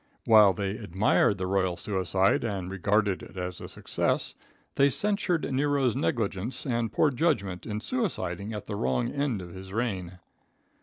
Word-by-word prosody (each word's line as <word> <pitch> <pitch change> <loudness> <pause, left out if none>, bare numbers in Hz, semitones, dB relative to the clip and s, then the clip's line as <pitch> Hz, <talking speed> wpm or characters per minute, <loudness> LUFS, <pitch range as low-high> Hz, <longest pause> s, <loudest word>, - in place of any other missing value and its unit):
While 105 -3 +7
they 100 +1 -2
admired 100 +1 +2
the 95 - -2
royal 95 -2 0
suicide 95 -1 +1
and 95 -5 -3
regarded 100 +1 +1
it - - -12
as 90 -1 -5
a - - -6
success, - - -1 0.4
they 140 0 +4
censured 180 - +1
Nero's 140 -3 +1
negligence 115 - -2
and 120 -4 -1
poor 150 - +3
judgment 120 - -1
in 105 -1 -3
suiciding 105 - -2
at 105 - -6
the 105 - -4
wrong 65 -7 0
end 135 -9 -1
of 85 -1 -10
his 95 0 -10
reign. 95 -6 -3
105 Hz, 155 wpm, -28 LUFS, 95-130 Hz, 0.4 s, While